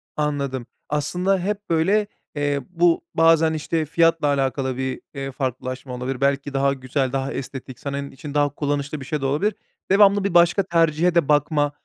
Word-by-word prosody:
Anladım. 140 -4 -2 0.2
Aslında 180 +6 0
hep 205 +3 -3
böyle, 195 +6 +2 0.3
eee, 145 -1 0
bu 175 -1 +2
bazen 165 -1 +4
işte 155 +1 -1
fiyatla 165 0 +2
alakalı 135 -2 0
bir, 130 0 -3
eee, 135 -1 -5
farklılaşma 130 -1 -4
olabilir. 125 +1 -4
Belki 140 0 0
daha 135 0 +2
güzel, 130 0 -2
daha 135 0 -2
estetik 130 -1 -7
senin 140 0 -4
için 145 +2 -9
daha 145 -1 +2
kullanışlı 145 0 -3
bir 130 - -8
şey 150 0 -3
de - - -2
olabilir. 155 +10 0 0.4
Devamlı 200 0 +5
bir 200 -3 -1
başka 175 +3 +5
tercihe 170 0 +2
de 170 -5 +3
bakma, 145 0 +2
145 Hz, 165 wpm, -22 LUFS, 135-165 Hz, 0.4 s, Devamlı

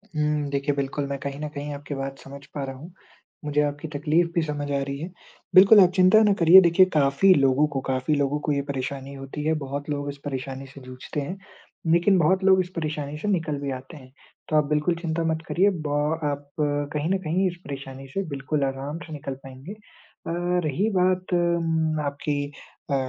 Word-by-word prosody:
हुँ। 150 -1 0
देखिए 140 +1 0
बिल्कुल, 140 +1 -2
मैं 140 0 -3
कहीं 140 +1 -5
न 150 - -3
कहीं 145 0 -6
आपकी 145 0 -6
बात 135 0 -5
समझ 140 0 -11
पा 140 - -3
रहा 135 0 -5
हूँ। 165 +7 -12 0.5
मुझे 150 0 +1
आपकी 145 +2 -2
तकलीफ़ 160 +3 +2
भी 170 - +3
समझ 145 -1 -3
आ 140 -1 0
रही 140 0 -4
है। 170 +4 -5 0.5
बिल्कुल 200 +3 +9
आप 180 - +6
चिंता 185 +4 +6
ना 205 -1 +4
करिए, 175 +3 +9
देखिए 175 +2 +5
काफ़ी 150 +6 +4
लोगों 140 0 +3
को, 135 -3 -3
काफ़ी 130 +3 0
लोगों 145 +1 0
को 150 - -2
ये 140 -1 +1
परेशानी 135 0 -4
होती 135 +2 -7
है, 160 - +2
बहुत 140 +2 -5
लोग 145 -1 -2
इस 140 - -7
परेशानी 135 0 -5
से 135 +1 -13
जूझते 130 +3 -6
हैं। 180 +7 -5 0.6
लेकिन 185 +3 +4
बहुत 190 +4 +2
लोग 190 -1 +5
इस 180 - -6
परेशानी 150 -2 -3
से 210 - -5
निकल 165 -7 0
भी 140 -1 -3
आते 130 +4 -8
हैं। 130 -2 -15 0.4
तो 155 - 0
आप 150 -1 +4
बिल्कुल 150 +3 +1
चिंता 165 -1 -1
मत 160 - -4
करिए 195 +4 +3 0.2
ब 145 0 0 0.3
आप 145 0 -3
कहीं 145 +2 -1
न 195 - +2
कहीं 180 +4 +1
इस 175 - -3
परेशानी 135 -1 -8
से 195 +9 -3
बिल्कुल 140 +1 -2
आराम 135 +3 -3
से 160 - -10
निकल 140 -2 -5
पायेंगे। 135 +8 -9
अ, 210 -5 -13 0.3
रही 185 +10 0
बात 185 0 +1
मम्म 165 -3 +1
आपकी 145 0 -2 0.5
अ, - - +3
145 Hz, 205 wpm, -25 LUFS, 140-170 Hz, 0.6 s, बिल्कुल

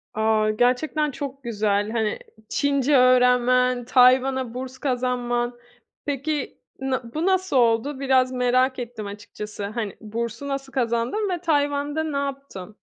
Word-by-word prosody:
A! 220 0 +2
Gerçekten 285 +6 +1
çok 275 0 -7
güzel. 210 -2 0
Hani, 220 -2 -1 0.3
Çince 280 0 +2
öğrenmen, 250 0 +4
Tayvan'a 255 0 +4
burs 255 +1 -6
kazanman. 245 -2 -1 0.5
Peki, 285 0 -3 0.2
na 260 -3 -3
bu 315 +3 -1
nasıl 375 -4 +1
oldu? 240 +4 +2
Biraz 260 -2 +2
merak 255 +1 +1
ettim 230 -4 -6
açıkçası. 205 0 -7
Hani, 215 -1 -4
bursu 230 +4 -5
nasıl 275 -1 -4
kazandın 245 - 0
ve 355 -2 -2
Tayvan'da 290 -1 0
ne 300 -3 -3
yaptın? 275 -8 -6
255 Hz, 125 wpm, -23 LUFS, 235-280 Hz, 0.5 s, öğrenmen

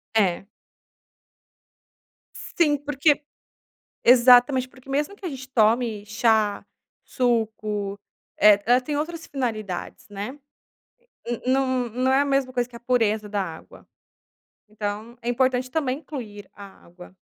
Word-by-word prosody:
É. 195 -4 +2 1.9
Sim. 300 -4 0
Porque 290 +1 +1 0.8
Exatamente, 250 +1 +6
porque 260 +1 -18
mesmo 290 +7 -1
que 405 - -11
a - - -2
gente 265 -2 -9
tome 225 -3 +1
chá, 210 -1 +1 0.4
suco, 215 -5 -1 0.4
eh, 205 0 +6
ela 245 +2 +5
tem 290 +3 -4
outras 325 +2 -4
finalidades, 220 - -4
né? 205 +8 -6 0.9
N 240 -1 -4
não 260 -2 +1
não 255 +3 0
é 270 - +4
a - - +1
mesma 275 -2 0
coisa 245 -1 0
que 240 - -14
a - - -9
pureza 225 -4 0
da 205 -1 -1
água. 165 -3 -11 0.8
Então 215 +2 -6
é 235 - -3
importante 255 0 +1
também 275 -3 -1
incluir 215 -10 -9
a 200 -1 -14
água. 175 +2 -15
245 Hz, 130 wpm, -24 LUFS, 210-265 Hz, 1.9 s, Exatamente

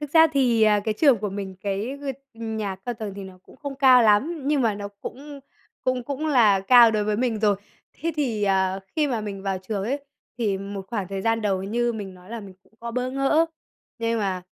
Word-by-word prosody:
Thực 295 -1 -6
ra 320 -1 +8
thì, 245 -5 +3
à, 210 -1 +5
cái 220 - 0
trường 270 -1 +4
của 210 0 -3
mình, 195 -1 -6
cái 205 +7 -3
g - - -10 0.3
nhà 220 -4 -4
cao 215 +6 -5
tầng 215 -3 -6
thì 200 -1 -7
nó 190 -1 -12
cũng - - -18
không 280 -2 -6
cao 260 -2 +7
lắm, 265 +10 +3
nhưng 295 -1 +2
mà 225 -3 +2
nó 200 0 -6
cũng 285 +2 -8 0.4
cũng 255 -1 0
cũng 285 +4 -3
là 225 -9 +4
cao 235 +4 +7
đối 215 -1 0
với 210 0 0
mình 240 -2 0
rồi. 205 -2 +3 0.4
Thế 330 +3 -3
thì, 240 -8 -1
à, 190 -1 +1 0.2
khi 305 -2 +3
mà 245 -5 -1
mình 200 -2 -6
vào 195 -1 -1
trường 195 +1 -4
ấy 275 +5 -3 0.3
thì 205 -5 0
một 195 0 -6
khoảng 205 -6 -3
thời 195 -1 -4
gian 225 +1 +1
đầu 195 -3 0
như 235 +4 0
mình 200 -4 -6
nói 180 +2 -16
là 235 -1 -5
mình 195 -2 -11
cũng - - -30
có 235 0 -5
bỡ 250 +2 -2
ngỡ, 275 +5 +2 0.5
nhưng 230 0 0
mà, 190 -3 -1
220 Hz, 235 wpm, -24 LUFS, 200-255 Hz, 0.5 s, ra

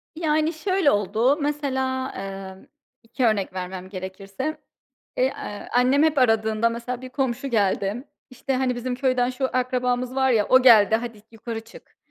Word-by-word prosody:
Yani, 315 0 +1
şöyle 370 -1 +1
oldu: 220 - +2
Mesela, 265 -3 -1
emm, 195 -1 -7 0.4
2 235 +3 -2
örnek 205 -4 +1
vermem 185 0 -6
gerekirse, 195 +9 -5 0.6
eee, - - +2
aaa, 205 - -8
annem 255 +4 +3
hep 315 -2 +2
aradığında 225 -2 +2
mesela 235 +1 -5
bir 255 - -8
komşu 265 0 -2
geldi. 205 +1 0 0.3
İşte, 255 +2 -3
"Hani, 255 -1 0
bizim 250 +1 -3
köyden 255 -1 +1
şu 260 +1 -2
akrabamız 250 0 -1
var 265 0 +2
ya, 215 -4 +2
o 255 0 +6
geldi, 220 -4 +7
hadi, 230 -3 -7
yukarı 225 0 -6
çık." 225 +2 -17
245 Hz, 155 wpm, -24 LUFS, 215-265 Hz, 0.6 s, geldi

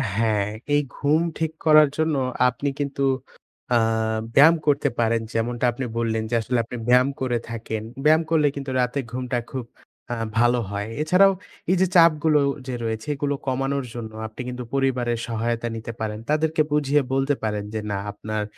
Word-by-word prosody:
হ্যাঁ, 105 -2 +1 0.3
এই 145 - +4
ঘুম 150 +3 +2 0.2
ঠিক 160 -1 -1
করার 155 -2 +7
জন্য 160 -1 +1 0.3
আপনি 140 +4 -3
কিন্তু 140 -1 -2 0.7
আ - - +6 0.6
ব্যায়াম 160 +4 +8
করতে 145 -1 +3
পারেন, 115 0 +2
যেমনটা 120 +2 -1
আপনি 125 +2 -4
বললেন 110 -1 0
যে 120 - 0
আসলে 125 +3 -1
আপনি 125 - -7
ব্যায়াম 125 +2 +5
করে 125 -2 +1
থাকেন, 110 -1 -4 0.2
ব্যায়াম 155 +2 +5
করলে 155 -3 +3
কিন্তু 140 -1 -5
রাতে 125 +3 0
ঘুমটা 125 -1 -2
খুব 130 -3 -4 0.5
আ - - -1 0.2
ভালো 120 +1 +4
হয়। 100 +1 -3
এছাড়াও 180 +5 +5 0.4
এই - - +4
যে 190 - +4
চাপগুলো 160 -3 +5 0.3
যে 130 - -3
রয়েছে, 110 +2 -3
এগুলো 145 0 -1
কমানোর 135 +1 -1
জন্য 115 -2 -6 0.2
আপনি 110 +3 -9
কিন্তু 125 0 -5
পরিবারের 125 -3 0
সহায়তা 115 0 -2
নিতে 115 +1 -6
পারেন, 110 -1 -3
তাদেরকে 155 +1 +2
বুঝিয়ে 145 -1 +2
বলতে 135 +1 +1
পারেন 105 -2 -1
যে, 110 - -1
না 100 - -1
আপনার 110 +1 -4
125 Hz, 170 wpm, -23 LUFS, 115-145 Hz, 0.7 s, ব্যায়াম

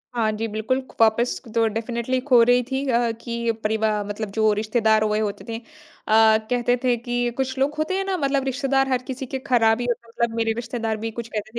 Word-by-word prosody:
हाँ 220 -2 +1
जी, 220 +1 -3
बिल्कुल 220 +5 -1 0.2
वापस 225 +2 +3 0.2
तो 230 -1 +3
डेफ़िनिटली 235 +3 -2
खो 250 -4 +6
रही 245 +1 +4
थी 270 +1 -1
अ, 235 -1 +2
कि 235 -1 -2
परिवा 215 -1 0
मतलब 205 +1 -5
जो 220 -1 +4
रिश्तेदार 220 0 +2
हुए 215 0 +1
होते 210 -2 -3
थे, 225 - -3
अ, - - -11 0.9
कहते 245 0 +2
थे 250 -1 +3
कि 240 +1 -1
कुछ 260 0 -2
लोग 285 +2 +1
होते 315 +5 -1
हैं 390 - 0
ना, 385 -1 -1
मतलब 275 -3 0
रिश्तेदार 270 +1 +1
हर 255 -1 +1
किसी 265 0 -5
के 265 +1 -4
ख़राब 235 -4 +2
ही 245 - -2
होते 235 0 -3
हैं। - - -17
मतलब 235 -1 0
मेरे 225 -1 +1
रिश्तेदार 230 -1 -3
भी 225 - -2
कुछ 235 0 -6
कहते 215 -1 -5
235 Hz, 220 wpm, -23 LUFS, 220-255 Hz, 0.9 s, खो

